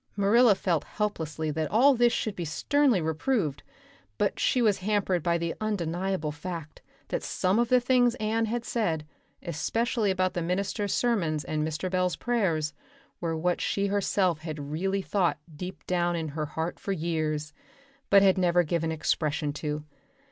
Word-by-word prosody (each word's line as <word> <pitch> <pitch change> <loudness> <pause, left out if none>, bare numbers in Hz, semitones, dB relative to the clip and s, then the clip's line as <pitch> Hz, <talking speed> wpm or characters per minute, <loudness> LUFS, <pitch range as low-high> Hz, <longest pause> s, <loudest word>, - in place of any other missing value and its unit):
Marilla 210 +2 +5
felt 170 -5 0
helplessly 160 -7 -3
that 155 +1 -2
all 265 +6 +5
this 240 -1 +4
should 215 -3 -2
be 175 - -4
sternly 255 - +2
reproved, 160 - -1 0.6
but - - 0
she 255 - +2
was 215 -5 +3
hampered 195 -2 0
by 170 +2 +1
the 170 0 -2
undeniable 185 -5 -1
fact 155 0 -7 0.3
that - - -1
some 185 +4 0
of 240 -1 +1
the 255 - +5
things 245 -1 +3
Anne 225 0 0
had 235 +2 -3
said, 165 -10 -1 0.4
especially 220 +7 0
about 185 -1 +1
the 175 - -2
minister's 195 +4 -1
sermons 170 -11 +1
and 155 +2 -2
Mr. 155 +3 -2
Bell's 180 -1 0
prayers, 170 - 0 0.5
were 165 -2 -2
what 175 +2 0
she 200 - 0
herself 195 -4 +1
had 155 -3 -6
really 190 +5 -1
thought 185 -5 +1 0.2
deep 180 +4 -7
down 175 -1 +1
in 160 -2 -3
her 150 +1 -3
heart 160 +3 -4
for 200 - -4
years, 155 -3 -2 0.6
but 200 0 +7
had 190 -1 +4
never 175 -1 +3
given 165 0 -1
expression 150 -1 -1
to. 150 0 -3
180 Hz, 160 wpm, -28 LUFS, 160-210 Hz, 0.6 s, but